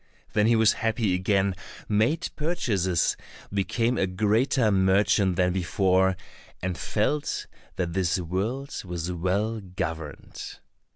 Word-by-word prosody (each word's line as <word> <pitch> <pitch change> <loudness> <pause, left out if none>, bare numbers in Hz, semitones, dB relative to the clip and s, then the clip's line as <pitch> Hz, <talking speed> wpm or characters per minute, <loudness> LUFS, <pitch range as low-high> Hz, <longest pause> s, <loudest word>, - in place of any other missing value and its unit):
Then 105 0 +3
he 115 - +5
was 110 0 +5
happy 110 -3 +1
again, 95 +1 +2 0.3
made 115 +11 +1
purchases, 105 - 0 0.4
became 115 +5 0
a 95 - +2
greater 110 +5 +2
merchant 95 0 +3
than 90 0 +2
before, 95 +1 +2 0.4
and 90 -1 -2
felt 145 - -1 0.3
that 85 -2 -2
this 90 -1 +1
world 100 +11 -3
was 90 -2 -4
well 100 +6 -1
governed. 80 -5 -6
95 Hz, 115 wpm, -26 LUFS, 90-110 Hz, 0.4 s, he